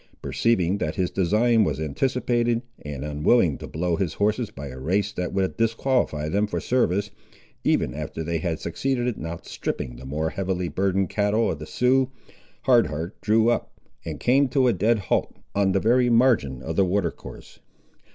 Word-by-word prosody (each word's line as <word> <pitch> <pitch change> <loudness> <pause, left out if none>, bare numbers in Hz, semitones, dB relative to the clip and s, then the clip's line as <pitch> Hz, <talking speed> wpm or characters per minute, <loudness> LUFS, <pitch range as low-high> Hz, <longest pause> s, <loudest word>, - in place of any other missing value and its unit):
Perceiving 100 -4 +1
that 75 - -2
his 90 -1 -1
design 110 +5 +3
was 75 -5 -1
anticipated, 120 - 0 0.2
and 75 -1 -6
unwilling 75 - +2
to - - -7
blow 85 +1 -1
his 90 -4 -2
horses 105 +3 0
by 70 +1 -8
a 65 0 -9
race 100 +8 0
that 90 -4 -3
would 95 -1 -1
disqualify 115 - 0
them 100 +6 +1
for - - -2
service, 105 -5 0 0.5
even - - +1
after 80 - -5
they 85 +1 -1
had 80 -1 -2
succeeded 125 +6 -1
in 80 - -6
outstripping 80 -6 -5
the 65 - -11
more 80 +3 -2
heavily 90 -2 -2
burdened 95 -1 0
cattle 105 +2 +1
of 75 - -5
the 75 - -8
Siouxes, 130 +1 +2 0.5
Hard 120 -6 +5
Heart 80 +5 -6
drew 110 +2 +3
up, - - -3 0.2
and - - -6
came 135 +3 +3
to 130 0 +3
a 120 - +4
dead 110 +5 +2
halt 100 - -1 0.2
on 100 -1 +2
the 95 - +2
very 120 +4 +3
margin 115 - +3
of - - -4
the 100 - +5
water 90 -2 0
course. - - -12
100 Hz, 180 wpm, -24 LUFS, 80-115 Hz, 0.5 s, Hard